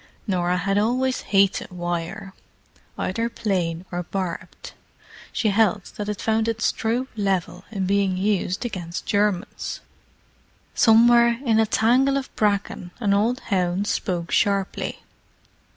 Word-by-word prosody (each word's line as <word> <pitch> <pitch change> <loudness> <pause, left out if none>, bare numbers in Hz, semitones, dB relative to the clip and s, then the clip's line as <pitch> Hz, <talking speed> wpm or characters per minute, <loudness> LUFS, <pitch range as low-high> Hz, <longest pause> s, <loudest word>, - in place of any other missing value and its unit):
Norah 180 -3 0
had 195 +3 +1
always 255 +4 +1
hated 195 -1 +2
wire, 175 +3 -4 0.6
either 230 +5 -1
plain 180 -6 -2
or 175 0 -2
barbed. 180 -1 -5 0.6
She 220 - 0
held 205 -2 +1
that 210 0 -4
it 210 - -3
found 220 0 +1
its 230 0 +1
true 235 +4 -1
level 190 -3 -1
in 195 -3 -2
being 195 -1 +1
used 195 +1 0
against 175 -6 -5
Germans. 205 -1 -1 0.9
Somewhere 235 +1 +5
in 225 -2 +3
a 220 - +3
tangle 255 +6 +3
of 270 - -6
bracken 200 -3 0
an 205 -4 +2
old 225 +5 +1
hound 185 +1 +1
spoke 175 -5 -2
sharply. 200 -1 0
200 Hz, 125 wpm, -23 LUFS, 185-225 Hz, 0.9 s, Somewhere